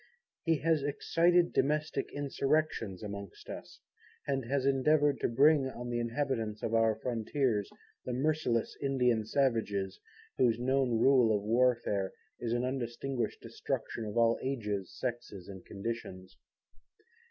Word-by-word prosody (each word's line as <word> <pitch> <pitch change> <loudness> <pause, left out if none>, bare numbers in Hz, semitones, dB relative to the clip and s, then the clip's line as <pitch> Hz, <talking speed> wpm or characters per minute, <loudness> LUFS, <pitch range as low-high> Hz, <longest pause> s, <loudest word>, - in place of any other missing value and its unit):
He 165 -2 +2
has 160 -1 +2
excited 170 +5 +2
domestic 150 +3 0
insurrections 140 -8 -1
amongst 100 -2 -8
us, - - -9 0.4
and 135 -1 -1
has 135 +2 0
endeavoured 140 +1 +3
to - - +1
bring 135 +3 +4
on 120 -1 -6
the 120 - 0
inhabitants 115 -3 -2
of 115 - -1
our 115 -1 +3
frontiers, 115 -1 -1 0.3
the - - -4
merciless 135 -3 0
Indian 125 -5 +2
Savages, 110 -8 0 0.4
whose 120 -3 +4
known 130 -1 +1
rule 120 -3 +5
of 100 - -6
warfare, 115 -4 +1 0.3
is 115 - -3
an 120 +1 +1
undistinguished 130 0 -3
destruction 115 - -4
of 105 +1 -5
all 115 0 +4
ages, 105 -8 -3
sexes 120 -7 -5
and 95 -2 -9
conditions. 100 -3 -6
120 Hz, 130 wpm, -32 LUFS, 110-140 Hz, 0.4 s, rule